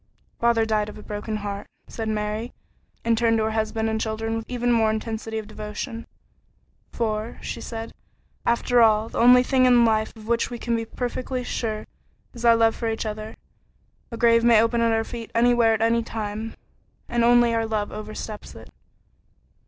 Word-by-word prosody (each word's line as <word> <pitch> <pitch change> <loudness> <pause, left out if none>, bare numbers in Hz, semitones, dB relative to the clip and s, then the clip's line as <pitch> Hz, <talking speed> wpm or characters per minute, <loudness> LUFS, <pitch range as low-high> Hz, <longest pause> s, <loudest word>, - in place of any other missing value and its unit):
"Father 235 -1 +3
died 215 -1 0
of 210 - -10
a 210 - -11
broken 210 +1 -4
heart," 200 0 -5 0.2
said 225 -1 -4
Mary, 215 +2 -3 0.5
and 230 0 +3
turned 225 0 +2
to 220 - +1
her 220 - 0
husband 220 0 -1
and 220 0 -1
children 225 0 -2
with 225 0 -5
even 245 -1 0
more 225 -2 +3
intensity 220 0 -3
of 220 - -4
devotion. 215 +2 -6 0.8
"For," 220 -1 -2
she - - -5
said, 225 -1 -6 0.5
"after 240 +1 +2
all, 220 0 +4
the - - -4
only 250 +1 +7
thing 255 0 +3
in 240 -1 +6
life 220 -1 +1
of 220 -1 -12
which 235 0 +1
we 240 - -5
can 235 0 -1
be 225 0 -2
perfectly 250 +2 -4
sure 220 -3 -3 0.5
is 235 - -9
our 235 -1 +6
love 225 -1 +3
for 230 - -2
each 225 0 -3
other. 215 0 -5 0.7
A 230 - -7
grave 230 0 +4
may 235 -2 +6
open 230 +1 +2
at 230 0 +3
our 225 0 +1
feet 230 -1 -7
anywhere 235 -1 +4
at 220 - -4
any 230 +1 +3
time, 220 0 -5 0.5
and 240 -1 0
only 240 0 +5
love 215 -2 -2
oversteps 215 0 -7
it." - - -13
225 Hz, 185 wpm, -24 LUFS, 220-235 Hz, 0.8 s, only